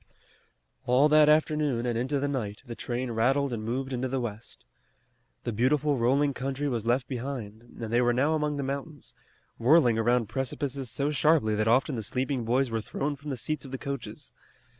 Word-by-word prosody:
All 130 +4 +5
that 150 0 +6
afternoon 150 -5 +2
and 120 -1 -1
into 130 +5 0
the 145 - 0
night 110 -7 -4
the 120 - -6
train 120 +1 -3
rattled 130 +4 +1
and 110 -2 -4
moved 130 +4 -3
into 130 +1 -1
the 135 +1 -2
west. 115 - -7 0.8
The - - -2
beautiful 140 +6 +2
rolling 140 +4 +2
country 135 +2 -3
was 115 -4 -2
left 125 +2 +1
behind, 120 -5 -5 0.2
and 115 -1 -5
they 120 - +4
were 120 0 +3
now 135 +6 +2
among 150 -1 0
the 140 - -2
mountains, 140 +2 -6 0.5
whirling 120 -2 +4
around 120 0 +2
precipices 135 +2 -3
so 140 +5 -1
sharply 150 -6 +3
that 110 +1 0
often 125 +4 +3
the 115 - -2
sleeping 125 +3 -2
boys 125 +2 +1
were 115 -1 -1
thrown 145 +7 -3
from 145 +2 -9
the 135 - -3
seats 150 +7 -3
of 135 - -9
the 135 - -4
coaches. 140 -2 -6
130 Hz, 190 wpm, -28 LUFS, 120-140 Hz, 0.8 s, that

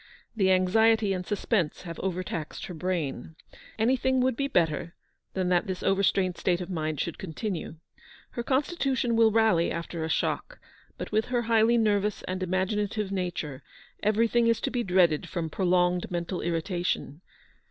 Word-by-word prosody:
The 195 -4 +2
anxiety 210 +3 +3
and 180 -1 -3
suspense 200 -6 -1
have 170 -2 -7
overtaxed 180 -4 -4
her 180 - -7
brain. 160 -3 -3 0.4
Anything 260 +3 +2
would 255 -1 +2
be 275 +3 -1
better 165 - 0 0.4
than 185 -1 0
that 180 +3 +2
this 185 -1 -4
overstrained 195 -2 +2
state 175 -1 +1
of 180 0 -6
the - - -4
mind 155 -3 -2
should 170 - -3
continue. 180 -1 -4 0.6
Her 240 - -4
constitution 265 -2 0
will 225 -1 +6
rally 220 -6 +3
after 170 0 -4
a 160 - -3
shock; - - -1 0.4
but - - -6
with 215 +1 +2
her 245 -1 0
highly 230 +1 +4
nervous 210 -2 +1
and 185 0 -4
imaginative 195 +2 -1
nature, 175 -7 -3 0.4
everything 230 +3 +2
is 230 -1 +3
to - - -1
be 245 0 0
dreaded 180 -5 +2
from 165 -4 -3
prolonged 180 -1 +1
mental 175 +1 -3
irritation. 175 -2 -2
190 Hz, 155 wpm, -27 LUFS, 175-225 Hz, 0.6 s, will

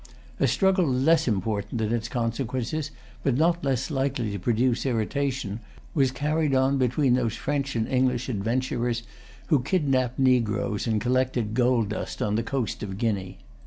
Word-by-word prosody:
A - - +3
struggle 190 -3 +3
less 135 +6 +3
important 105 +1 -1
in 110 +1 0
its 115 -1 -1
consequences, 125 +5 -2 0.3
but 130 -3 +1
not 170 +2 +2
less 135 +1 0
likely 135 -5 -1
to 100 - -4
produce 120 +4 +1
irritation, 125 -2 -1 0.3
was 135 -4 +3
carried 150 +2 0
on 135 +1 +2
between 125 +1 +2
those 120 -3 +1
French 140 +2 -2
and 115 -1 0
English 125 -1 +1
adventurers 120 +1 -1 0.5
who 145 -5 +4
kidnapped 130 -5 +1
negroes 120 -5 +1
and 110 -2 +1
collected 125 -2 0
gold 120 -3 +2
dust 105 - -4
on 105 - 0
the 110 - +1
coast 120 -2 -3
of 95 -2 -5
Guinea. 100 -4 -2
125 Hz, 155 wpm, -26 LUFS, 115-135 Hz, 0.5 s, who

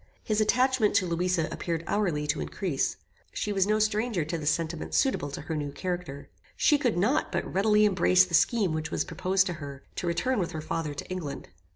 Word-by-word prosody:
His 215 0 +1
attachment 250 0 +2
to 185 - +4
Louisa 175 -1 0
appeared 165 -1 -3
hourly 175 -8 0
to 145 - -1
increase. 75 0 -2 0.4
She 210 - -2
was 195 -1 +2
no 215 +1 +3
stranger 215 -4 0
to 165 +2 -3
the 150 - -5
sentiments 165 +1 -1
suitable 260 - +1
to 140 - -6
her 160 +2 -4
new 145 -2 -3
character. 175 -5 -5 0.3
She 295 -2 +4
could 245 -9 +1
not 220 +11 +1
but - - -1
readily 210 +2 +3
embrace 90 - +4
the - - -12
scheme 210 -8 +3
which 155 0 -3
was - - -1
proposed 190 +1 +1
to 180 - -2
her, 140 -1 -8
to 180 - -2
return 245 +8 0
with 175 -1 -2
her 155 - -4
father 155 -1 -3
to - - -6
England. 160 - -5
180 Hz, 205 wpm, -28 LUFS, 155-210 Hz, 0.4 s, to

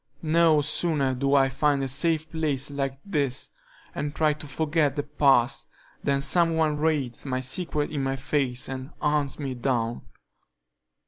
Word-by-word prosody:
No 160 -1 +4
sooner 145 -2 0
do 140 +2 +1
I 135 -1 +5
find 140 +1 +1
a - - -1
safe 160 +4 +1
place 150 -4 0
like 135 -1 -3
this, 145 -10 -1 0.4
and 145 +1 -4
try 155 -1 +2
to 150 0 -10
forget 150 0 0
the 145 - -1
past, 135 -4 +2 0.4
than 140 -1 +1
some 165 +3 +3
one 155 -2 +1
reads 150 -6 -1
my 130 -2 -2
secret 150 +3 -1
in 145 -3 -2
my 135 0 -1
face 135 -2 -1
and 130 0 -6
hunts 150 -2 0
me 140 -3 -4
down. 120 -2 -1
145 Hz, 155 wpm, -26 LUFS, 135-155 Hz, 0.4 s, I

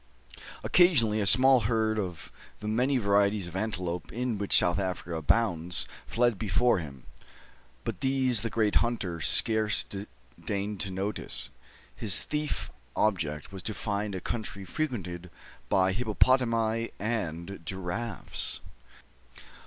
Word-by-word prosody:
Occasionally, 115 -12 +4
a 100 - +1
small 130 +5 +7
herd 110 -2 +1
of 90 -5 -5
some - - -21
of - - -33
the 105 - -5
many 125 +5 +2
varieties 100 -2 +2
of 85 - -9
antelopes 90 -4 -3
in 120 -3 -2
which 100 - +3
South 85 +2 +3
Africa 90 -3 -3
abounds 85 +1 0 0.2
fled 120 -4 +1
before 110 +1 +2
him; 70 -6 -9 0.8
but - - -5
these 130 -4 +2
the 115 - -1
great 110 -2 +1
hunter 95 -8 -1
scarce 110 +3 +3 0.6
deigned 100 0 -2
to 95 - 0
notice. 95 +3 -3 0.4
His 100 - +4
thief 150 0 -3 0.2
object 80 -8 -1
was 95 - -6
to 110 +2 -4
find 100 -1 -3
a 95 - -5
country 105 -3 -5
frequented 90 - -4 0.4
by 95 -1 +3
hippopotami 115 0 +1
and 100 -4 -3
giraffes. 95 +6 -2
105 Hz, 130 wpm, -28 LUFS, 90-115 Hz, 0.8 s, small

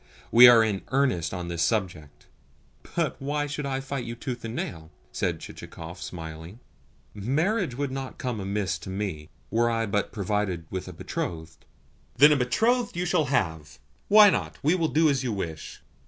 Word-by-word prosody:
We 125 +1 +10
are 120 -2 +8
in 105 -3 -1
earnest 130 -12 +1
on 90 -2 -5
this 85 -1 -3
subject." 85 -9 -2 0.7
"But - - -1
why 145 +2 -1
should 145 0 -4
I 135 -1 -1
fight 135 -1 -4
you 120 0 -6
tooth 125 -1 -6
and 115 +1 -5
nail?" 80 -7 -5 0.2
said - - -2
Chichikov, 85 +2 -10
smiling. 80 +4 -8 0.5
"Marriage 150 - 0
would 140 0 -2
not 135 -1 -6
come 125 -4 -3
amiss 95 -2 -2
to 85 - -9
me, 95 -6 -4 0.2
were 120 +2 +2
I 115 -1 0
but 100 -1 -1
provided 100 -4 -2
with 95 -1 -4
a 90 - -8
betrothed." 80 0 -6 0.5
"Then 145 +2 +8
a - - +5
betrothed 225 - +1
you 180 - 0
shall 175 -3 +2
have. 80 - -1 0.3
Why 210 -1 +8
not? - - -2
We 155 +4 +4
will 170 -3 +1
do 155 +3 +3
as 135 -3 +1
you 125 - -1
wish." 85 -6 -6
115 Hz, 175 wpm, -26 LUFS, 90-140 Hz, 0.7 s, We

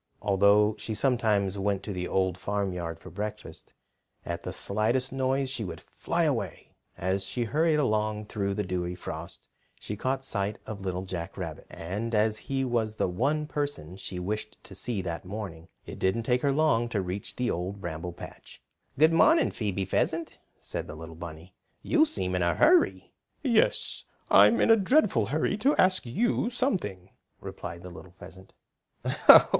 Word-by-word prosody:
Although 100 +1 +4
she 110 - -4
sometimes 105 -6 +1
went 100 0 0
to 105 - -4
the 90 -1 -3
Old 95 -2 +1
Farmyard 90 -4 -3
for 90 - -12
breakfast, 105 +4 -6 0.5
at - - -3
the - - -5
slightest 115 +6 0
noise 135 +1 +1
she 130 -4 -3
would 85 -5 -6
fly - - -2
away. - - -2 0.3
As 95 +2 -1
she 120 - -2
hurried 155 +7 +2
along 110 -5 0
through 100 -1 -2
the 105 - -1
dewy 90 -1 -2
frost 90 - -6 0.3
she 105 - -5
caught 130 +5 -1
sight 105 -4 -1
of 105 -3 -6
Little 95 -1 -3
Jack 85 -3 -5
Rabbit. - - -6
And 105 +7 -4
as 105 0 +2
he 135 -1 0
was 115 -3 0
the - - +1
one 140 +12 0
person 145 - -3
she 95 -1 -6
wished 105 +4 -4
to 100 - -12
see 100 0 -3
that 85 -1 -4
morning, 90 -4 -7 0.2
it - - -8
didn't 95 +5 +1
take 125 +2 +1
her 140 - +2
long 135 -6 +2
to 110 - -1
reach 95 +1 -3
the 125 -1 0
Old 90 +4 -3
Bramble 85 -1 -5
Patch. - - -11 0.4
"Good 155 +3 +5
morning, 320 - +5
Phoebe 100 -3 -2
Pheasant," 160 - -1 0.2
said - - -5
the - - -7
little 80 +1 -9
bunny. 85 +2 -9 0.3
"You 315 -1 +4
seem 90 - -2
in 90 - 0
a 85 0 +2
hurry." 345 +2 +4 0.3
"Yes, 235 -6 +2 0.3
I'm 235 - +7
in - - +5
a 225 - +7
dreadful 195 - +3
hurry 155 - 0
to 270 +8 +3
ask 185 -7 +3
you 235 - +1
something," 175 - -1 0.3
replied 85 0 -7
the 90 - -8
little 90 +1 -12
pheasant. 95 +1 -13
105 Hz, 170 wpm, -28 LUFS, 90-130 Hz, 0.5 s, I'm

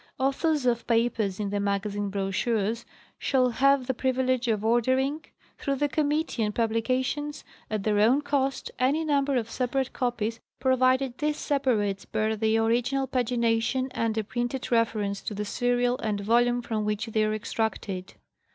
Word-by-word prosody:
Authors 275 +2 +1
of 235 -1 +1
papers 225 -4 +1
in 205 -2 -2
the 205 - 0
magazine 200 0 -1
brochures 205 +3 -1 0.3
shall 255 -2 +2
have 275 +2 +3
the 260 - 0
privilege 255 0 0
of 215 -2 0
ordering, 260 +6 +2 0.4
through 275 - -1
the 290 +2 +1
Committee 295 -3 0
on 210 - 0
Publications, 255 +6 -1 0.3
at 215 -2 -2
their 210 -1 +2
own 250 +7 +4
cost, 275 -2 -1
any 285 +6 +2
number 280 -2 +1
of 235 -3 0
separate 260 +1 -1
copies, 235 -2 -2 0.2
provided 260 0 +2
these 300 0 0
separates 220 -9 0
bear 215 +1 0
the 220 +1 +1
original 240 +4 +1
pagination 245 0 0
and 225 -1 -1
a 220 - +1
printed 240 +4 -3
reference 215 -4 +1
to 210 - -5
the 210 +1 -3
serial 245 +3 +1
and 215 -2 -1
volume 240 +3 +2
from 220 -2 -2
which 210 +2 -1
they 220 -1 0
are 215 0 0
extracted. 205 -3 -3
240 Hz, 155 wpm, -27 LUFS, 215-260 Hz, 0.4 s, own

